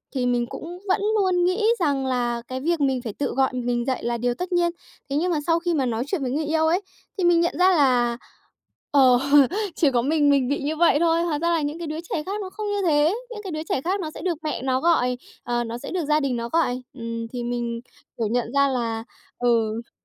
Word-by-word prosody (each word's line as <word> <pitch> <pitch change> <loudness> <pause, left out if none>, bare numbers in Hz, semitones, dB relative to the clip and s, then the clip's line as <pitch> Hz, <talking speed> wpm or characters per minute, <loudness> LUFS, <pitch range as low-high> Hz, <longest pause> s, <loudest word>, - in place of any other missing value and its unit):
thì 250 -1 0
mình 245 -1 +1
cũng 345 +8 -8
vẫn 400 +2 +2 0.2
luôn 365 -2 +2
nghĩ 370 +5 +1
rằng 280 -5 +1
là 240 -2 -1
cái 260 0 -4
việc 335 0 0
mình 265 -3 +1
phải 220 -4 -5
tự 285 - -2
gọi 265 -1 +3
mình 245 -1 -1
dậy 260 -1 -2
là 235 0 -1
điều 245 +1 0
tất 360 +6 -5
nhiên. 345 -1 +2 0.4
Thế 275 - -2
nhưng 355 +3 +1
mà 310 - +1
sau 330 0 +3
khi 345 0 -1
mà 275 -4 +1
nói 235 0 -1
chuyện 330 -2 -2
với 255 -2 -2
người 305 +2 -1
yêu 320 +1 +1
ấy, 355 +5 +2 0.4
thì 370 - -1
mình 345 -1 +5
nhận 340 - +1
ra 370 - +6
là, 245 -5 +3 0.7
ờ, 260 -3 +6 0.6
chỉ 295 -4 +3
có 240 -2 +2
mình 290 +2 +2
mình 275 -3 +3
bị 285 - 0
như 305 +2 -1
vậy 320 -2 +4
thôi. 335 0 +2
Hóa 305 -4 -1
ra 340 +1 +1
là 330 -2 +2
những 295 +2 -3
cái 340 -2 -5
đứa 310 - -4
trẻ 300 - -2
khác 405 +2 -3
nó 380 - -5
không 425 +2 -5
như 410 -1 -1
thế, 305 +3 +3 0.2
những 425 -3 -8
cái 375 - -5
đứa 310 0 -3
trẻ 260 - 0
khác 375 +5 -1
nó 310 -2 -4
sẽ - - -9
được 350 -4 -1
mẹ 305 -5 -3
nó 260 0 0
gọi, 250 -7 +2 0.3
ờ, 240 0 -1
nó 230 +1 -5
sẽ - - -8
được 355 -4 -1
gia 300 +1 +3
đình 275 -4 -1
nó 235 0 -4
gọi. 255 -7 +1
Ừm, 230 -2 -5
thì 240 0 -5
mình, 235 -1 -3 0.4
kiểu, 225 -2 0
nhận 240 +2 -1
ra 280 0 +4
là 230 -4 -2 0.4
ừ. 230 -1 0
285 Hz, 255 wpm, -24 LUFS, 245-335 Hz, 0.7 s, ra